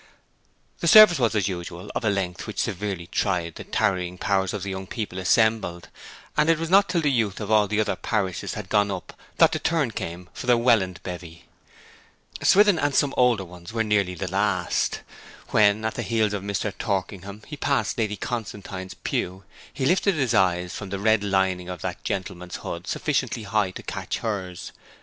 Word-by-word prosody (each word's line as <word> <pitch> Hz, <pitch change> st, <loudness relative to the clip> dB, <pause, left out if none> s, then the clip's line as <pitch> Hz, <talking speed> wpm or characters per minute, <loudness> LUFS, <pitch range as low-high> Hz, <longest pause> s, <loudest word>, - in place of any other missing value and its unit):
The -, -, -1 dB
service 215 Hz, -8 st, +9 dB
was, 115 Hz, -3 st, +2 dB
as 100 Hz, -3 st, +1 dB
usual, 85 Hz, -1 st, -6 dB
of -, -, -3 dB
a 110 Hz, -, +2 dB
length 95 Hz, -3 st, -2 dB
which -, -, -7 dB
severely 95 Hz, -2 st, -2 dB
tried 90 Hz, -2 st, -1 dB
the -, -, -8 dB
tarrying 90 Hz, -4 st, -1 dB
powers 95 Hz, 0 st, 0 dB
of 100 Hz, -3 st, -4 dB
the 100 Hz, -, -3 dB
young 95 Hz, 0 st, -5 dB
people 100 Hz, -4 st, -4 dB
assembled; 95 Hz, -3 st, +1 dB, 0.5 s
and 150 Hz, +1 st, +3 dB
it 165 Hz, -, +4 dB
was 165 Hz, +1 st, -4 dB
not 200 Hz, +1 st, +6 dB
till 175 Hz, -2 st, +1 dB
the 150 Hz, -2 st, +2 dB
youth 110 Hz, -6 st, 0 dB
of 105 Hz, -1 st, -4 dB
all 105 Hz, -1 st, +5 dB
the 105 Hz, +1 st, -1 dB
other 110 Hz, -1 st, +1 dB
parishes 95 Hz, -5 st, -2 dB
had 105 Hz, -3 st, -6 dB
gone 105 Hz, 0 st, +2 dB
up 95 Hz, -2 st, -6 dB, 0.2 s
that -, -, +6 dB
the -, -, -1 dB
turn 160 Hz, -7 st, 0 dB
came 90 Hz, -3 st, -6 dB
for -, -, -7 dB
the 120 Hz, -1 st, +5 dB
Welland 110 Hz, -7 st, +2 dB
bevy. 85 Hz, -2 st, -8 dB, 1.0 s
Swithin 205 Hz, -3 st, +5 dB
and 145 Hz, -2 st, 0 dB
some 140 Hz, -1 st, +2 dB
older 120 Hz, -6 st, +3 dB
ones 90 Hz, +2 st, -11 dB
were 115 Hz, -1 st, +1 dB
nearly 100 Hz, -4 st, +1 dB
the 95 Hz, -, -4 dB
last. 95 Hz, -2 st, 0 dB, 0.5 s
When, 105 Hz, 0 st, +3 dB
at 110 Hz, -, -1 dB
the -, -, -4 dB
heels 110 Hz, -3 st, +1 dB
of 100 Hz, -, -2 dB
Mr. 100 Hz, 0 st, -3 dB
Torkingham, 100 Hz, 0 st, -4 dB
he 150 Hz, -, -7 dB
passed 135 Hz, -6 st, 0 dB
Lady 105 Hz, -2 st, 0 dB
Constantine's 100 Hz, -5 st, -5 dB
pew, 95 Hz, +2 st, -3 dB, 0.3 s
he 130 Hz, -, -3 dB
lifted 190 Hz, +4 st, +3 dB
his 130 Hz, -5 st, 0 dB
eyes 90 Hz, -3 st, +2 dB
from 100 Hz, -, -6 dB
the 100 Hz, -, -3 dB
red 110 Hz, +1 st, +2 dB
lining 95 Hz, -2 st, 0 dB
of 90 Hz, -3 st, -6 dB
that -, -, -4 dB
gentleman's 90 Hz, -1 st, -4 dB
hood 85 Hz, +2 st, -6 dB
sufficiently 130 Hz, -6 st, -1 dB
high 105 Hz, -1 st, +1 dB
to 90 Hz, -, -9 dB
catch -, -, -4 dB
hers. 95 Hz, -5 st, -4 dB
100 Hz, 190 wpm, -24 LUFS, 95-115 Hz, 1.0 s, service